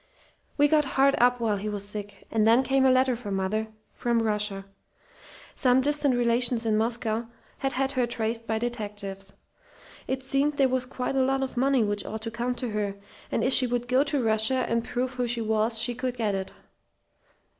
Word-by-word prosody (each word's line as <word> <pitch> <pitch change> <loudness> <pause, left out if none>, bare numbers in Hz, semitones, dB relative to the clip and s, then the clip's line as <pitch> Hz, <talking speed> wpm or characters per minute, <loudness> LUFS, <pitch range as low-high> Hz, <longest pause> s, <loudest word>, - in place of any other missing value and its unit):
We 290 0 +5
got 300 0 +3
hard 275 +1 +5
up 245 0 +4
while 220 -3 0
he 210 +2 -4
was 205 -1 -5
sick; 205 0 -8
and 220 -1 +2
then 235 +4 +5
came 265 +1 +2
a - - +6
letter 255 0 +3
for 235 -3 -8
mother 195 +3 -1 0.3
from 235 -1 0
Russia. 210 -2 -2 0.9
Some 250 0 +3
distant 290 -1 +3
relations 240 0 +2
in 220 -1 +2
Moscow 225 0 -1 0.3
had 270 0 -1
had 270 +1 0
her 255 -3 0
traced 230 0 -3
by 220 - 0
detectives. 205 -4 -4 0.7
It 265 0 -2
seemed 275 +2 0
there 270 - +4
was 255 0 -1
quite 255 0 -3
a 265 - +3
lot 270 +1 +1
of 265 - -5
money 265 -1 +2
which 205 -1 0
ought 220 +1 -6
to 225 - -3
come 240 +2 -2
to 245 -2 -4
her, 205 -2 -2 0.4
and - - 0
if 260 - +3
she 255 - +5
would 245 0 -2
go 255 +2 +3
to 280 -3 -1
Russia 220 +4 +2
and 230 0 0
prove 250 +2 -2
who 250 -1 -2
she 235 0 -1
was 220 +1 0
she 235 +2 +1
could 250 0 -4
get 215 -3 0
it. 190 -1 -4
240 Hz, 200 wpm, -26 LUFS, 220-260 Hz, 0.9 s, a